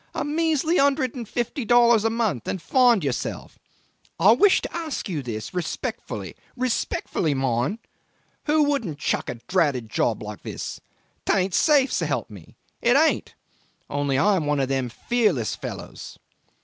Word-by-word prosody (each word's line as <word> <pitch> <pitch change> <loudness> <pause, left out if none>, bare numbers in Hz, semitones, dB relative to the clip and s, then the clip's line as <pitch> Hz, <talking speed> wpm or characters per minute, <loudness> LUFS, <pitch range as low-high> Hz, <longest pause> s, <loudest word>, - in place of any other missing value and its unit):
A - - -1
measly 320 +2 +1
hundred 275 -3 +2
and 235 -5 -7
fifty 240 +2 -2
dollars 235 -1 +5
a 225 - +2
month 220 - -1
and 190 - -2
find 240 - +3
yourself. 135 -4 -4 0.6
I 190 +6 +7
wish 375 - +5
to - - -6
ask 320 -7 -4
you 165 -7 -3 0.3
respectfully 180 -3 -4 0.2
respectfully, 225 - -1
mind 130 - 0 0.7
who 305 0 +3
wouldn't 275 - -1
chuck 155 - -1
a - - -3
dratted 130 - 0
job 110 -1 0
like 105 -1 -8
this? - - -6 0.4
'Tain't 190 -1 +1
safe, 285 -3 +4
s'elp - - -1
me, - - -13 0.3
it 245 +3 +4
ain't! 315 +2 +2 0.6
Only 145 -2 0
I 195 +8 +3
am 155 -4 -2
one 145 -1 +1
of 135 -1 0
them 135 -2 -1
fearless 185 - 0
fellows - - -8
210 Hz, 150 wpm, -24 LUFS, -, 0.7 s, I